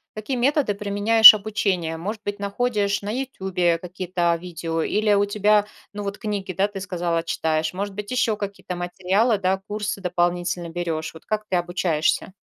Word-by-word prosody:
какие 215 +5 -3
методы 275 -2 +1
применяешь 210 +2 +8
обучения? 195 -6 -2
Может 205 +6 -5
быть, 205 0 -4
находишь 200 -1 -1
на 205 - -5
"Ютюбе" 190 -9 -1
какие-то, 180 0 -2
а, - - -1
видео 165 -1 -4
или 210 0 +1
у 200 0 +3
тебя, 210 0 +2 0.3
ну, 205 0 -5
вот 200 +1 -4
книги, 205 -4 -4
да, 195 +3 +1
ты 205 -1 -8
сказала, 175 -3 -2
читаешь? 160 -1 -1
Может 200 +2 -4
быть, 210 +2 -6
ещё 250 -4 +1
какие-то 200 -3 -6
материалы, 190 +6 0
да, 190 0 0
курсы 210 -1 -3
дополнительно 175 -1 -1
берешь? 165 -2 -4
Вот 160 - -14
как 215 0 -2
ты 185 - 0
обучаешься? 175 -1 0
195 Hz, 170 wpm, -23 LUFS, 175-210 Hz, 0.3 s, применяешь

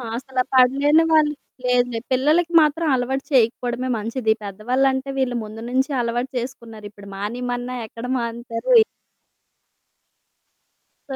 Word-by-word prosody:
అసల 260 +1 -5
పడలేని 275 +5 +4
వాళ్ళు 305 -2 +4 0.3
లేదులే 245 -1 +1
పిల్లలకి 305 +7 +2
మాత్రం 310 +2 +1
అలవాటు 265 +2 -2
చేయకపోవడమే 245 0 +1
మంచిది. 220 +1 0
పెద్దవాళ్ళంటే 260 +7 -1
వీళ్ళు 255 -2 0
ముందు 215 +1 -9
నుంచే 265 +3 0
అలవాటు 240 +2 -2
చేసుకున్నారు. 235 -4 -8
ఇప్పుడు 200 -1 -14
మానేయమన్నా 245 +4 -4
ఎక్కడ 230 +2 -9
మానుతారు. 235 - -1 2.3
సో 270 - -4
250 Hz, 110 wpm, -22 LUFS, 230-270 Hz, 2.3 s, పడలేని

